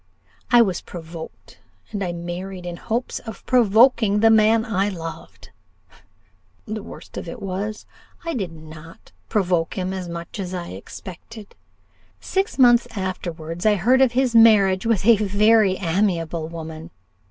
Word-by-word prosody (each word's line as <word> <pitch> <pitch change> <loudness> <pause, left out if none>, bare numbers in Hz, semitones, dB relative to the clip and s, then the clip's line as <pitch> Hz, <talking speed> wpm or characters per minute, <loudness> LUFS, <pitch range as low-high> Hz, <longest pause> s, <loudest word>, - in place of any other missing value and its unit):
I 240 -1 +7
was 190 -5 -2
provoked, 165 -1 -10 0.3
and 205 -2 -3
I 180 - -2
married 175 +2 -6
in 175 -1 -5
hopes 235 +7 -3
of 225 -4 -10
provoking 230 -2 +4
the 225 +1 +5
man 220 +1 +4
I 200 -3 0
loved. 165 -4 -9 1.1
The 215 0 -5
worst - - -11
of - - -6
it - - -7
was, 200 +3 -4 0.4
I 335 - -2
did 195 -9 -3
not 160 0 -13 0.2
provoke 180 -5 0
him 185 0 -2
as 185 -2 -5
much 170 +4 -7
as 185 -1 -4
I 175 -1 -5
expected. 190 - -10 0.7
Six 390 +2 -2
months 240 -2 +5
afterwards 175 -3 -5
I 215 -1 +4
heard 245 +8 +3
of 260 -3 +4
his 255 -1 +1
marriage 210 -3 +5
with 215 -4 +1
a 230 -1 +6
very 210 0 +3
amiable 170 -3 -1
woman. 160 0 -8
195 Hz, 145 wpm, -22 LUFS, 170-220 Hz, 1.1 s, I